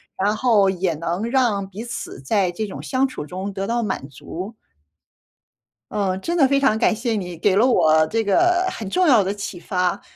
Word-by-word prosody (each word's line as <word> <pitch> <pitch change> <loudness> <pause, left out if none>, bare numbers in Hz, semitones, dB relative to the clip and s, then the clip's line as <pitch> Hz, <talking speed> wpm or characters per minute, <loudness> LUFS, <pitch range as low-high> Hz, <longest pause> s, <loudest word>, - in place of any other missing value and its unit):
然 205 +3 0
后 215 -6 +3
也 185 -2 -1
能 170 +8 -3
让 235 -7 +1
彼 195 +4 -8
此 235 - -7
在 185 +6 +1
这 215 +4 -4
种 195 - -8
相 265 0 0
处 255 - -7
中 185 +6 -5
得 195 0 -4
到 235 +1 0
满 190 -9 -3
足。 180 - -8 1.4
嗯， 190 -2 -1
真 340 - -3
的 280 -6 +5
非 275 +1 +2
常 265 -6 +2
感 230 - +3
谢 230 0 -2
你 180 -4 -5
给 190 +2 +2
了 215 +5 +4
我 155 -10 +4
这 225 +5 0
个 355 - +3
很 215 -4 -6
重 365 - +2
要 240 -9 +6
的 190 - -1
启 200 -3 -6
发， 180 -2 -1
205 Hz, 215 characters per minute, -21 LUFS, 185-235 Hz, 1.4 s, 要